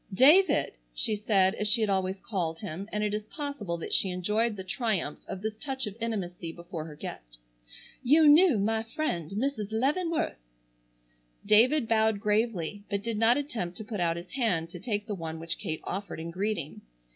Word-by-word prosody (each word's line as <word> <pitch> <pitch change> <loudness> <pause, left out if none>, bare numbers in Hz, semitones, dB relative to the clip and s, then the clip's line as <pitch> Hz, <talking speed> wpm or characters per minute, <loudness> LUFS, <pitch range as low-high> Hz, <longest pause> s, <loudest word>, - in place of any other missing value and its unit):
"David," 295 - +5 0.2
she 210 - +1
said, 200 -3 +3
as 210 - -1
she 215 +3 +5
had 215 - +2
always 190 0 0
called 180 -6 -2
him, 195 +1 -6
and 210 0 -1
it 210 -1 0
is 210 0 -3
possible 280 - -4
that 165 - -5
she 190 - +3
enjoyed 210 +5 0
the 190 - -6
triumph 190 - -2
of 190 - -6
this 220 0 -1
touch 265 -3 -2
of 205 -2 -6
intimacy 180 -7 -3
before 170 -2 -7
her 155 -2 -9
guest, - - -8 0.6
"you 300 +5 +5
knew 305 - +7
my 220 +2 +1
friend 220 - -3
Mrs. 215 +1 -2
Leavenworth!" 300 - 0 1.1
David 230 +6 +5
bowed 220 -2 +3
gravely, 210 -3 0
but 200 -1 -2
did 230 -2 -2
not 230 +3 +5
attempt 225 -12 -3
to - - -5
put 210 -1 -5
out 170 -1 +1
his 175 +2 -9
hand 185 -11 0
to - - -8
take 210 -4 -2
the 210 - -4
one 165 -3 -5
which 165 +1 -4
Kate 160 -1 -4
offered 195 -2 -5
in 165 +1 -5
greeting. 185 -4 -3
210 Hz, 185 wpm, -29 LUFS, 180-230 Hz, 1.1 s, knew